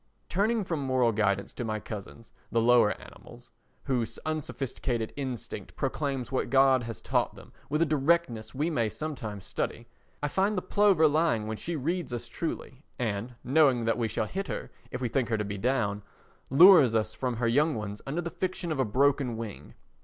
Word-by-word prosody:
* -, -, -42 dB
Turning 215 Hz, +4 st, +1 dB
for 175 Hz, -3 st, -2 dB
moral 130 Hz, -4 st, +2 dB
guidance 100 Hz, -2 st, 0 dB
to -, -, -4 dB
my 110 Hz, -2 st, -2 dB
cousins 105 Hz, +2 st, -9 dB, 0.2 s
the 115 Hz, -, +2 dB
lower 115 Hz, -2 st, +4 dB
animals—whose 120 Hz, -4 st, -6 dB
unsophisticated 135 Hz, -6 st, -3 dB
instinct 130 Hz, -5 st, -5 dB
proclaims 135 Hz, -4 st, -2 dB
what 130 Hz, -, -1 dB
God 135 Hz, -1 st, +5 dB
has 115 Hz, -4 st, -6 dB
taught -, -, 0 dB
them -, -, -14 dB, 0.2 s
with 150 Hz, +3 st, +2 dB
a -, -, +2 dB
directness 150 Hz, -6 st, +1 dB
we 155 Hz, +5 st, 0 dB
may 115 Hz, -7 st, +1 dB
sometimes 110 Hz, -9 st, -5 dB
study—I 120 Hz, +5 st, -5 dB
find 195 Hz, +6 st, +1 dB
the 180 Hz, -, -1 dB
plover 200 Hz, -6 st, +4 dB
lying 150 Hz, -7 st, +2 dB
when 110 Hz, 0 st, -4 dB
she 170 Hz, +8 st, -4 dB
reads 165 Hz, +2 st, -2 dB
us 120 Hz, -1 st, -4 dB
truly 135 Hz, 0 st, -5 dB
and, 115 Hz, +1 st, -3 dB
knowing 130 Hz, -3 st, +4 dB
that 115 Hz, +1 st, +1 dB
we 115 Hz, -, +1 dB
shall 110 Hz, -, -1 dB
hit 195 Hz, -, -4 dB
her -, -, -5 dB, 0.2 s
if 125 Hz, -, -5 dB
we 125 Hz, -, +1 dB
think 125 Hz, 0 st, 0 dB
her 110 Hz, -, +1 dB
to 105 Hz, -, -2 dB
be 100 Hz, 0 st, -5 dB
down, 110 Hz, -4 st, 0 dB, 0.5 s
lures 145 Hz, -, +8 dB
us 110 Hz, 0 st, 0 dB
from 125 Hz, -2 st, -2 dB
her 115 Hz, +1 st, 0 dB
young 150 Hz, +6 st, +3 dB
ones 105 Hz, -1 st, -5 dB
under 155 Hz, +6 st, -1 dB
the 170 Hz, 0 st, -5 dB
fiction 180 Hz, -2 st, -3 dB
of 150 Hz, -, -2 dB
a 130 Hz, -, +3 dB
broken 130 Hz, +1 st, +2 dB
wing. 105 Hz, -12 st, -7 dB
130 Hz, 185 wpm, -28 LUFS, 115-155 Hz, 0.5 s, lures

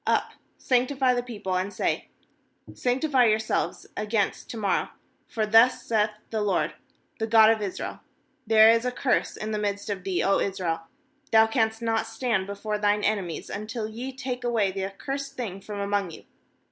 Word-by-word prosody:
^Up, -, -, +1 dB, 0.3 s
sanctify 255 Hz, +1 st, +2 dB
the 245 Hz, -, 0 dB
people, 215 Hz, -6 st, -5 dB
and 185 Hz, +2 st, -1 dB
say: -, -, -1 dB, 0.7 s
Sanc 250 Hz, +3 st, -1 dB
tify 260 Hz, -6 st, +4 dB
yourselves 215 Hz, 0 st, -1 dB
against 210 Hz, -1 st, -1 dB
to 230 Hz, -, -6 dB
morrow; 200 Hz, -3 st, 0 dB, 0.4 s
for 220 Hz, -2 st, -1 dB
thus 225 Hz, +4 st, +5 dB
saith^ 215 Hz, -2 st, +1 dB, 0.2 s
the 220 Hz, -1 st, -1 dB
LORD, 205 Hz, -2 st, 0 dB, 0.5 s
the 220 Hz, -, -1 dB
God 220 Hz, 0 st, +7 dB
of 220 Hz, -1 st, 0 dB
Israel: 200 Hz, -3 st, -4 dB, 0.5 s
There 220 Hz, 0 st, +7 dB
is 230 Hz, 0 st, +2 dB
a 250 Hz, -, 0 dB
curse 250 Hz, 0 st, 0 dB
in 215 Hz, 0 st, -4 dB
the 215 Hz, -, -1 dB
midst 205 Hz, 0 st, -2 dB
of 190 Hz, -2 st, -4 dB
thee, 190 Hz, -2 st, 0 dB
O 195 Hz, -, +3 dB
Israel; 170 Hz, -4 st, -2 dB, 0.4 s
thou 220 Hz, 0 st, +7 dB
canst 220 Hz, 0 st, 0 dB
not 225 Hz, -1 st, 0 dB
stand 220 Hz, -7 st, -1 dB
before 210 Hz, +1 st, -3 dB
thine 205 Hz, 0 st, +2 dB
enemies, 195 Hz, -6 st, -1 dB
until 215 Hz, +2 st, -4 dB
ye 240 Hz, +5 st, -6 dB
take 255 Hz, -2 st, -5 dB
away 225 Hz, -5 st, +1 dB
the 190 Hz, 0 st, -3 dB
accursed 275 Hz, +8 st, -5 dB
thing 195 Hz, -6 st, -5 dB
from 205 Hz, +1 st, -7 dB
among 200 Hz, -2 st, 0 dB
you. 165 Hz, -, -11 dB
215 Hz, 175 wpm, -26 LUFS, 200-240 Hz, 0.7 s, God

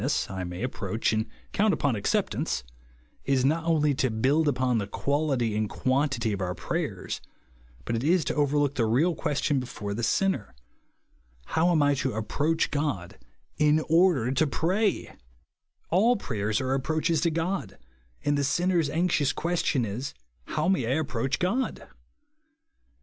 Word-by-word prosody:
13 -, -, -1 dB
Liess, -, -, -1 dB
I 95 Hz, -1 st, -4 dB
may 90 Hz, +4 st, -5 dB
approach 115 Hz, -3 st, -1 dB
and 110 Hz, 0 st, 0 dB, 0.2 s
count 210 Hz, 0 st, +2 dB
upon 140 Hz, -5 st, 0 dB
ac 100 Hz, -, -6 dB
ceptance, -, -, -2 dB, 0.6 s
is 135 Hz, -2 st, +1 dB
not 160 Hz, +4 st, +1 dB
only 150 Hz, -3 st, +3 dB
to 130 Hz, -1 st, +1 dB
build 135 Hz, +8 st, +2 dB
upon 125 Hz, -4 st, +1 dB
the 100 Hz, -, -3 dB
quality 135 Hz, -2 st, 0 dB
and 105 Hz, -1 st, 0 dB
quantity 130 Hz, -4 st, 0 dB
of 100 Hz, -, -4 dB
our 90 Hz, -1 st, -2 dB
prayers, -, -, -3 dB, 0.6 s
but 115 Hz, -, -1 dB
it 115 Hz, -, -2 dB
is 165 Hz, +2 st, +3 dB
to -, -, -1 dB
overlook 145 Hz, -1 st, +1 dB
the 120 Hz, -5 st, +1 dB
real 145 Hz, +11 st, +3 dB
question 145 Hz, -2 st, 0 dB
before 115 Hz, -5 st, -5 dB
the 115 Hz, -, -3 dB
sinner, 120 Hz, -, 0 dB, 0.4 s
" -, -, -36 dB
How 165 Hz, +2 st, +3 dB
am 155 Hz, -4 st, +3 dB
I 145 Hz, 0 st, +4 dB
to 130 Hz, -1 st, -1 dB
approach 150 Hz, +9 st, 0 dB
God 145 Hz, -, -2 dB, 0.4 s
in 150 Hz, +1 st, +4 dB
order 165 Hz, -8 st, +4 dB
to 150 Hz, +4 st, +2 dB
f^ray 190 Hz, +8 st, 0 dB
T' -, -, -13 dB, 0.8 s
All 225 Hz, +8 st, +4 dB
prayers 110 Hz, -, -2 dB
are 130 Hz, 0 st, -1 dB
ap 135 Hz, -, 0 dB
proaches 160 Hz, +2 st, 0 dB
to 170 Hz, -, +3 dB
God, 165 Hz, -, -2 dB, 0.5 s
and 145 Hz, -, +2 dB
the 145 Hz, -, +1 dB
sinner's 175 Hz, +1 st, +1 dB
anxious 160 Hz, -3 st, +1 dB
question 160 Hz, -7 st, 0 dB
is, 120 Hz, +7 st, -5 dB
" -, -, -41 dB
How 155 Hz, +2 st, +1 dB
may 185 Hz, -11 st, +2 dB
I 130 Hz, +5 st, +1 dB
approach 135 Hz, -2 st, -1 dB
God 235 Hz, +9 st, -1 dB
140 Hz, 170 wpm, -27 LUFS, 115-160 Hz, 0.8 s, I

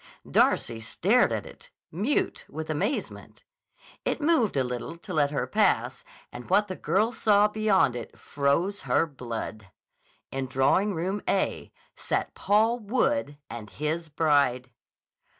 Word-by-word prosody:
Darcy 115 Hz, -1 st, +2 dB
stared 110 Hz, 0 st, +2 dB
at -, -, -2 dB
it, -, -, -14 dB, 0.2 s
mute 210 Hz, -, -1 dB
with 155 Hz, +1 st, -5 dB
amazement. 155 Hz, -, -3 dB, 0.6 s
It -, -, -1 dB
moved 290 Hz, -, +2 dB
a 135 Hz, -, +3 dB
little 125 Hz, +6 st, -5 dB
to 180 Hz, +2 st, -8 dB
let 145 Hz, -3 st, +2 dB
her 145 Hz, -, -1 dB
pass -, -, +1 dB, 0.3 s
and 120 Hz, -2 st, -10 dB
what 210 Hz, 0 st, +3 dB
the 185 Hz, -, -5 dB
girl 200 Hz, +9 st, +1 dB
saw 210 Hz, -3 st, +4 dB
beyond 210 Hz, -, +2 dB
it 120 Hz, -2 st, -7 dB
froze 155 Hz, +8 st, 0 dB
her -, -, +3 dB
blood. 115 Hz, -7 st, -6 dB, 0.6 s
In 135 Hz, 0 st, -3 dB
Drawing 135 Hz, +10 st, +2 dB
Room 190 Hz, +5 st, -2 dB
A 195 Hz, -, -1 dB, 0.2 s
sat -, -, -2 dB
Paul 220 Hz, +4 st, +2 dB
Wood 250 Hz, -, 0 dB
and 115 Hz, -3 st, -8 dB
his 155 Hz, +5 st, -3 dB
bride! 140 Hz, -5 st, +1 dB
160 Hz, 135 wpm, -27 LUFS, 135-210 Hz, 0.6 s, saw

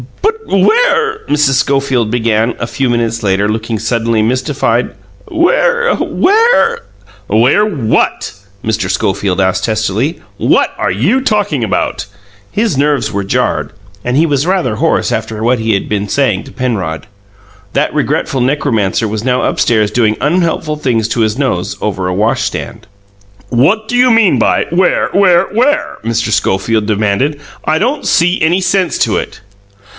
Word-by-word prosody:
"But 435 Hz, +2 st, +3 dB, 0.3 s
where," 450 Hz, -2 st, +2 dB
Mrs. 145 Hz, -2 st, +2 dB
Schofield 135 Hz, -4 st, 0 dB
began, 115 Hz, 0 st, 0 dB
a -, -, -3 dB
few 130 Hz, +2 st, -2 dB
minutes 115 Hz, -1 st, -1 dB
later, 100 Hz, 0 st, +1 dB
looking 110 Hz, +1 st, -2 dB
suddenly 115 Hz, 0 st, 0 dB
mystified 130 Hz, +5 st, -1 dB, 0.3 s
"where 475 Hz, +8 st, +2 dB
where 460 Hz, +3 st, +2 dB, 0.3 s
" 105 Hz, 0 st, -26 dB
"Where 120 Hz, -, +3 dB
what?" 145 Hz, -, -1 dB, 0.3 s
Mr. 110 Hz, -1 st, -1 dB
Schofield 95 Hz, -2 st, -1 dB
asked 95 Hz, -1 st, +1 dB
testily. 110 Hz, -, -1 dB, 0.2 s
"What -, -, +2 dB
are -, -, 0 dB
you 160 Hz, -, +1 dB
talking 205 Hz, -, 0 dB
about?" 105 Hz, -, -2 dB, 0.4 s
His 215 Hz, -6 st, 0 dB
nerves 140 Hz, -6 st, +1 dB
were 100 Hz, 0 st, -2 dB
jarred, 95 Hz, -, -1 dB, 0.3 s
and 125 Hz, +2 st, -1 dB
he 160 Hz, -, +4 dB
was 145 Hz, 0 st, 0 dB
rather 175 Hz, -, 0 dB
hoarse -, -, +1 dB
after 110 Hz, -1 st, -3 dB
what 120 Hz, +1 st, +2 dB
he 110 Hz, -1 st, +1 dB
had 100 Hz, -, -3 dB
been 105 Hz, -1 st, -2 dB
saying 125 Hz, -8 st, 0 dB
to -, -, -12 dB
Penrod. 105 Hz, -, -3 dB, 0.7 s
(That -, -, 0 dB
regretful 150 Hz, -1 st, -1 dB
necromancer 115 Hz, -6 st, 0 dB
was 110 Hz, +1 st, -4 dB
now 125 Hz, 0 st, 0 dB
upstairs 110 Hz, -3 st, +1 dB
doing 110 Hz, -3 st, +1 dB
unhelpful 160 Hz, -2 st, 0 dB
things 120 Hz, -7 st, 0 dB
to 115 Hz, -, -1 dB
his 110 Hz, +1 st, 0 dB
nose 125 Hz, -11 st, -2 dB
over 95 Hz, -3 st, -2 dB
a 90 Hz, -, -1 dB
washstand.) 115 Hz, +1 st, -2 dB, 0.6 s
"What 185 Hz, -, +2 dB
do 245 Hz, -, -2 dB
you 250 Hz, +1 st, +4 dB
mean 225 Hz, -5 st, +4 dB
by, -, -, +2 dB
'Where, 180 Hz, +2 st, +2 dB
where, 185 Hz, -3 st, +4 dB
where?'" 290 Hz, +7 st, +1 dB
Mr. 115 Hz, 0 st, -1 dB
Schofield 105 Hz, +2 st, 0 dB
demanded. 110 Hz, +7 st, 0 dB, 0.2 s
"I 155 Hz, -, +1 dB
don't 255 Hz, -, -1 dB
see 175 Hz, +2 st, +2 dB
any 165 Hz, +4 st, +2 dB
sense 185 Hz, -1 st, 0 dB
to -, -, +1 dB
it." -, -, -5 dB
125 Hz, 150 wpm, -13 LUFS, 110-175 Hz, 0.7 s, he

